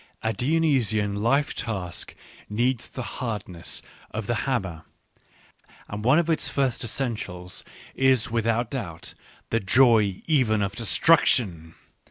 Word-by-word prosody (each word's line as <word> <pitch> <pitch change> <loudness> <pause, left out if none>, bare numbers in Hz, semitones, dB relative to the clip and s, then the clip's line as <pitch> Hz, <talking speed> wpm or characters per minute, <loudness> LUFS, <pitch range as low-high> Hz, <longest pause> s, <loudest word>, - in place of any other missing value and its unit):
(A 110 0 0
Dionysian 125 -8 +1
life 135 +7 +1
task 95 -6 -4 0.3
needs 120 +3 0
the 130 - -6 0.2
hardness 105 -8 -4 0.3
of 110 -1 -5
the 120 - 0 0.2
hammer, 95 -11 -2 1.1
and 105 +1 -5
one 130 +6 +5
of 170 -1 +2
its 165 -2 +1
first 135 -4 0
essentials 105 -8 -4 0.3
is 130 -4 +3
without 115 0 0
doubt 85 -12 -6 0.4
the 115 - +2
joy 110 -2 +4
even 120 -9 +2
of 100 +1 -3
destruction. 110 - +3
115 Hz, 120 wpm, -25 LUFS, 100-130 Hz, 1.1 s, one